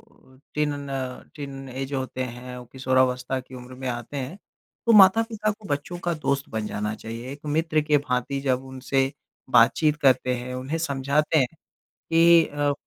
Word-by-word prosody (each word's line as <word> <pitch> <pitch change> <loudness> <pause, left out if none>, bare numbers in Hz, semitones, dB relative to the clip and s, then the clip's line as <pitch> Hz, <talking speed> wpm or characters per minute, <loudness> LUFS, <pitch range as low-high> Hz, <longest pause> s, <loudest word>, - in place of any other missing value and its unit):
अ, 130 0 -23 0.2
tin 150 -1 +1 0.2
न 130 -2 -5
teenage 135 -1 -6
होते 130 -1 -2
हैं, 125 +1 -8
वो 125 - -8
किशोरावस्था 130 0 +1
की 130 0 -14
उम्र 125 0 -10
में 130 0 -5
आते 120 +3 -5
हैं, 140 +7 -4 0.5
तो 230 - +5
माता-पिता 215 +2 +5
को 215 0 -8
बच्चों 145 +5 -3
का 175 - +1
दोस्त 140 -3 -1
बन 110 -1 -3
जाना 105 +1 -2
चाहिए। 115 +4 -7
एक 145 - -10
मित्र 155 +1 +1
के 150 -1 +3
भांति 135 0 -2
जब 130 -1 0
उनसे 135 +1 -1 0.4
बातचीत 155 -2 +5
करते 130 -2 +4
हैं, 125 +1 -5
उन्हें 130 +6 -3
समझाते 150 0 +1
हैं 130 - +4 0.4
कि 165 0 +5
अ, 145 0 0
135 Hz, 170 wpm, -25 LUFS, 125-150 Hz, 0.5 s, तो